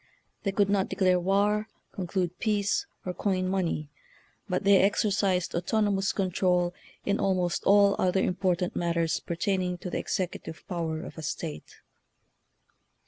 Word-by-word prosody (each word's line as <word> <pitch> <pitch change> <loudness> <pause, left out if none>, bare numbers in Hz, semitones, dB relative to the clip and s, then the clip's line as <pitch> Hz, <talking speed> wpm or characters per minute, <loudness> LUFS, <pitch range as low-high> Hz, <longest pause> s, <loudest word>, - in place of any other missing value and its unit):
They 195 - -1
could 200 0 +2
not 200 -1 +1
declare 185 -2 +3
war, 205 +4 +1 0.2
conclude 180 -2 -2
peace, 215 - 0 0.2
or 180 - -2
coin 185 0 0
money, 175 -5 -1 0.6
but 180 +2 0
they 200 0 +6
exercised 195 -2 +2
autonomous 195 +2 +1
control 180 -2 +1 0.3
in 200 - +1
almost 180 -3 0
all 200 0 +6
other 185 +1 +2
important 180 -1 0
matters 170 -1 0
pertaining 180 +1 -1
to 180 0 -6
the - - -1
executive 175 -3 -4
power 165 -2 -3
of - - -9
a - - -5
state. 75 - -6
185 Hz, 135 wpm, -28 LUFS, 175-200 Hz, 0.6 s, they